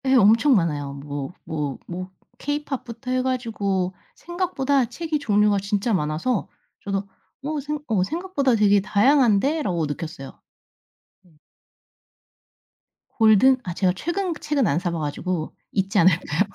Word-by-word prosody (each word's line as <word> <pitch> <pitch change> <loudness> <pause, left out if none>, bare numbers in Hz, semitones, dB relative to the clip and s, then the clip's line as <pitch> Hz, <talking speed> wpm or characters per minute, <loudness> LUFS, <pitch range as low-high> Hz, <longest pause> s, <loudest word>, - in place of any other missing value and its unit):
예 265 0 +4
엄청 230 +4 +5
많아요. 145 -7 0
뭐 140 0 -6
뭐 150 -4 -3
뭐 185 +1 -6 0.3
케이팝부터 270 -4 -4
해 255 0 +2
가지고 210 -8 -1 0.2
생각보다 285 -7 0
책이 315 +5 -3
종류가 210 -5 +3
진짜 200 +3 -1
많아서 170 +7 -1 0.4
저도 195 0 -2 0.4
어 300 +1 -2
생 295 +2 -4
'어 210 -5 +2
생각보다 310 - 0
되게 205 -2 +4
다양한데?'라고 220 - +2
느꼈어요. 150 -1 -7 0.9
어. 175 -3 -24 1.8
골든? 225 +4 +6
아 180 - -4
제가 180 0 +1
최근 345 - -2
책은 280 -6 +1
안 145 - +1
사 180 0 -2
봐가지고 160 +1 -3 0.2
있지 195 +1 +1
않을까요? 165 -3 +3
205 Hz, 270 characters per minute, -23 LUFS, 180-270 Hz, 1.8 s, 골든